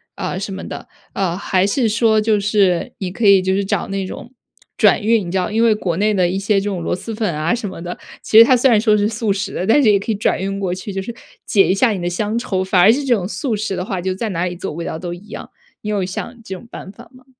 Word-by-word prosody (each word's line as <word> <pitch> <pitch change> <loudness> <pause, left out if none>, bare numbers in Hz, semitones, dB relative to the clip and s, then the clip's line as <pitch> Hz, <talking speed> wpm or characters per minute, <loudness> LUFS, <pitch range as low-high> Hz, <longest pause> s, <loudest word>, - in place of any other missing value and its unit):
啊， 185 - -4
什 195 +1 -5
么 195 - -6
的。 - - -8 0.3
啊， 180 -3 -1
还 190 0 0
是 230 +2 +1
说 220 0 +2
就 215 -1 +2
是 200 +1 +1
你 185 -2 -4
可 215 +2 0
以 195 -1 +7
就 190 0 0
是 200 +1 0
找 195 - -2
那 195 -1 -2
种 235 - -9 0.5
转 - - +4
运， 220 -4 +2
你 - - -5
知 190 - 0
道， 185 +3 -1
因 225 +2 +1
为 230 -2 +4
国 180 -5 -2
内 210 +1 +2
的 180 -3 +2
一 190 - -2
些 200 +1 +1
这 205 - -2
种 185 -4 -4
螺 - - -1
蛳 225 +5 -7
粉 210 -7 -2
啊 155 +5 0
什 230 -3 -3
么 185 -3 -8
的， 175 +1 -6 0.2
其 220 - +5
实 230 - +10
它 255 - +5
虽 250 +1 +3
然 220 - +5
说 215 -1 +3
是 205 +1 +1
速 220 -2 -1
食 195 0 -4
的， 185 - -3
但 285 +6 +4
是 215 - +5
也 200 - +3
可 200 - -8
以 - - -3
转 205 - 0
运 195 +1 -3
过 190 -3 -2
去， 190 +2 -6
就 195 - -3
是 235 +5 -6 0.3
解 195 -2 +3
一 185 - +2
下 235 +5 +3
你 190 - -3
的 175 - -1
乡 210 +5 -2
愁。 190 -5 -2
反 185 -1 +1
而 185 - +7
是 285 +2 -2
这 260 - +2
种 190 -6 -1
速 230 +1 -2
食 205 -2 -3
的 180 - -3
话 190 -1 -4
就 185 +1 -2
在 220 +3 -3
哪 175 -1 -2
里 180 0 -4
做 185 - -5
味 165 +2 -6
道 160 - -4
都 175 -1 -5
一 195 +5 -12
样， - - -8 0.3
你 210 - -5
有 200 -3 0
想 230 +5 -6
这 190 -3 -6
种 230 - -12
办 190 - -9
法 - - -15
吗？ 255 0 -19
200 Hz, 325 characters per minute, -18 LUFS, 185-220 Hz, 0.5 s, 实